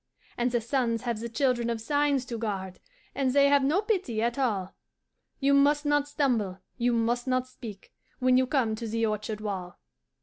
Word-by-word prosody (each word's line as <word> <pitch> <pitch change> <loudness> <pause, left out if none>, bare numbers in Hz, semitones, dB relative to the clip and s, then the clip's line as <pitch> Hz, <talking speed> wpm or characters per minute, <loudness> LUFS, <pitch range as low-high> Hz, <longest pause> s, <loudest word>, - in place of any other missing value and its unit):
"'And 240 +1 +1
the 240 -1 +1
suns 235 -1 0
have 235 -3 -2
the 235 +1 -5
Children 240 0 +1
of 230 -1 -1
Signs 285 +2 +1
to 240 -2 -5
guard, 190 -4 -4 0.3
And 265 -2 0
they 280 0 +5
have 285 -1 +4
no 320 +10 +2
pity 375 - -1
at 235 +3 -1
all 200 -8 -1 0.7
You 280 0 +3
must 290 +2 +4
not 290 0 +2
stumble, 240 -11 0 0.2
you 245 0 +1
must 240 +2 0
not 255 0 +1
speak, 225 -6 -11 0.2
When 255 0 +3
you 255 0 +3
come 250 -5 +1
to 230 0 -5
the 225 +1 0
orchard 215 0 -3
wall. 190 -4 -5
245 Hz, 190 wpm, -28 LUFS, 225-275 Hz, 0.7 s, they